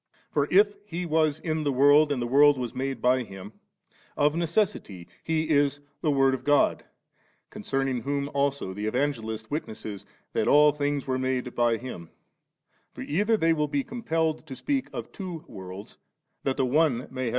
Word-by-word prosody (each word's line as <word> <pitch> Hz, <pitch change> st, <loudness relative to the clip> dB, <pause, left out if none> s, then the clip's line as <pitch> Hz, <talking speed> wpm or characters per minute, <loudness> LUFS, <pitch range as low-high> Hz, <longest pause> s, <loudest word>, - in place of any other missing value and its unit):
For 145 Hz, -1 st, +1 dB
if 205 Hz, +2 st, +5 dB
* -, -, -32 dB
He 180 Hz, +1 st, -2 dB
was 155 Hz, -2 st, +1 dB
in 155 Hz, -1 st, -2 dB
the 145 Hz, -, +1 dB
world, 145 Hz, +3 st, +5 dB
and 140 Hz, -, 0 dB
the 120 Hz, -, -1 dB
world 140 Hz, +3 st, +5 dB
was 125 Hz, -2 st, -4 dB
made 135 Hz, -2 st, -4 dB
by 125 Hz, +1 st, +4 dB
Him 100 Hz, -2 st, -9 dB, 0.3 s
«,' -, -, -33 dB
of 150 Hz, -, +3 dB
necessity 170 Hz, -, -1 dB, 0.2 s
He 160 Hz, -1 st, 0 dB
is 145 Hz, -1 st, +2 dB, 0.2 s
the 155 Hz, -, +1 dB
Word 135 Hz, -2 st, +3 dB
of 130 Hz, -1 st, -4 dB
God, 145 Hz, 0 st, +3 dB, 0.7 s
concerning 135 Hz, -2 st, -2 dB
whom 140 Hz, +2 st, -2 dB
also 140 Hz, -8 st, -1 dB
the 105 Hz, +2 st, -4 dB
Evangelist 110 Hz, -3 st, -2 dB
witnesses 110 Hz, -8 st, -5 dB, 0.3 s
that -, -, 0 dB
all 150 Hz, 0 st, +6 dB
things 145 Hz, -1 st, -2 dB
were 130 Hz, -1 st, -1 dB
made 130 Hz, -1 st, -2 dB
by 120 Hz, -1 st, +2 dB
Hint 110 Hz, -9 st, -8 dB, 0.9 s
For -, -, -8 dB
either 210 Hz, +8 st, +1 dB
they 165 Hz, -3 st, +3 dB
will 150 Hz, -2 st, 0 dB
be 145 Hz, -1 st, -1 dB
compelled 160 Hz, -, -2 dB
to 135 Hz, -, -7 dB
speak 275 Hz, -, -1 dB
of -, -, -7 dB
two 180 Hz, -5 st, -7 dB
worlds, 95 Hz, +2 st, -10 dB, 0.4 s
that 135 Hz, -, -1 dB
the 135 Hz, -, +2 dB
one 145 Hz, 0 st, +3 dB
may -, -, -4 dB
have 125 Hz, -, -10 dB
s -, -, -27 dB
John 130 Hz, -, -10 dB
xU. 130 Hz, -2 st, 0 dB
140 Hz, 195 wpm, -26 LUFS, 125-155 Hz, 0.9 s, all